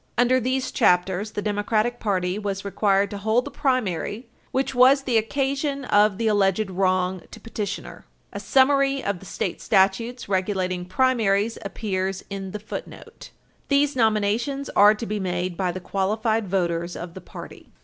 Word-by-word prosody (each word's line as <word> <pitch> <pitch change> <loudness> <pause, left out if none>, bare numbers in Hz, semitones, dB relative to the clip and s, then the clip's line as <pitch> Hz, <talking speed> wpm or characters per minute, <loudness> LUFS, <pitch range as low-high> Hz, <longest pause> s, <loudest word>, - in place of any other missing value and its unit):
Under 245 +2 +4
these 255 +2 -1
chapters, 185 +4 +1
the 205 - -3
Democratic 215 +3 0
Party 185 -2 -1
was 200 -1 -4
required 200 0 +1
to 205 - -5
hold 220 +4 +1
the 285 - -7
primary 235 - -1 0.2
which 270 +1 -1
was 265 +2 +5
the 255 -3 -1
occasion 275 +4 -2
of 205 -3 +3
the 230 - -2
alleged 205 -1 +2
wrong 185 -1 0
to 225 - -11
petitioner. 205 -2 -6 0.3
A - - -4
summary 275 0 +3
of 200 -3 -2
the 195 - -13
state - - -4
statutes 220 +5 +1
regulating 185 -2 -1
primaries 220 0 +1
appears 195 -2 -3
in 195 -1 -5
the 210 - -5
footnote. 210 - -7
[Footnote - - -15
6] - - -12 0.4
These 285 0 +2
nominations 230 +4 0
are 210 +1 +6
to 230 - -6
be 210 -1 -3
made 180 -1 -2
by 185 0 -1
the 185 - -6
qualified 215 +4 -1
voters 175 -2 -1
of 170 0 -7
the 190 - -9
party. - - -11
210 Hz, 165 wpm, -24 LUFS, 190-245 Hz, 0.4 s, are